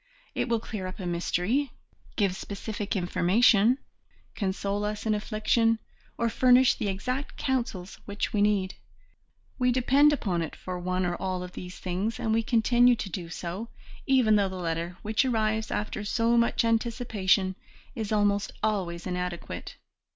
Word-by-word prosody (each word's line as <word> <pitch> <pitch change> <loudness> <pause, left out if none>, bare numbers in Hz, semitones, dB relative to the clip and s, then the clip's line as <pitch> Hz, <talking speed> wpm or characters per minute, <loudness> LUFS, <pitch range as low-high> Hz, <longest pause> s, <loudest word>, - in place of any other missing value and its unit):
It - - -1
will 230 -1 +2
clear 210 -4 -5
up 185 - -7
a 185 - -5
mystery, 180 +10 0 0.5
give 195 -4 +1
specific 205 +2 -5
information, 200 +6 +4 0.6
console 200 0 -2
us 210 +1 -3
in 220 - +2
affliction, 215 +2 +1 0.4
or 235 - +1
furnish 250 +2 +5
the 210 - -3
exact 255 +8 -3
counsels 235 -9 -2
which 205 0 -3
we 210 - +2
need; 200 -2 +2 0.9
we 250 0 +3
depend 270 +4 +4
upon 190 -12 -1
it 160 - -4
for 180 -1 -6
one 185 +1 -1
or 175 0 -1
all 185 -1 -3
of 180 - -8
these 180 0 -8
things, 195 +6 -2
and 225 -3 0
we 225 - +3
continue 240 +2 +4
to 205 -4 -5
do 175 -3 -5
so, 180 +6 -5 0.4
even 250 -6 +4
though 200 -2 +2
the 190 - -7
letter 170 0 -3
which 215 +4 +2
arrives 220 -3 0
after 210 0 -3
so 230 +3 +1
much 235 0 +2
anticipation 220 -5 +1 0.4
is 220 -2 -4
almost 205 -1 +2
always 185 -6 -1
inadequate. 180 -1 -4
210 Hz, 155 wpm, -27 LUFS, 185-230 Hz, 0.9 s, furnish